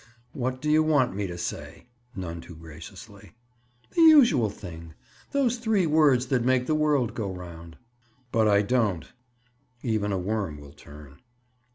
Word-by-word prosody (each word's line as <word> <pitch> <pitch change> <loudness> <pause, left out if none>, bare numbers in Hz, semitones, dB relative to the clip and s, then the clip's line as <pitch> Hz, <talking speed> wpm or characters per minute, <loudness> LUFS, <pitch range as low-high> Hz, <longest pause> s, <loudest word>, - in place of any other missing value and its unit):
"What 130 0 -3
do 150 - +1
you 155 +1 +5
want 145 -9 +2
me 100 -1 -2
to 85 -1 -7
say?" 85 - -6 0.3
None 85 -3 -6
too 85 - -12
graciously. 80 +7 -12 0.6
"The 335 - +1
usual 245 - +6
thing! 85 -5 -10 0.4
Those 255 -4 +1
three 220 -5 +1
words 150 -5 +3
that 125 -2 +2
make 130 0 +2
the 155 - 0
world 145 -7 +1
go 105 -5 -4
around." 85 -3 -10 0.5
"But 110 -1 +2
I 100 -1 +4
don't." 105 -7 0 0.8
Even 110 -4 -1
a 95 - 0
worm 95 -5 -3
will 70 -1 -13
turn. 75 -1 -14
110 Hz, 155 wpm, -26 LUFS, 85-140 Hz, 0.8 s, usual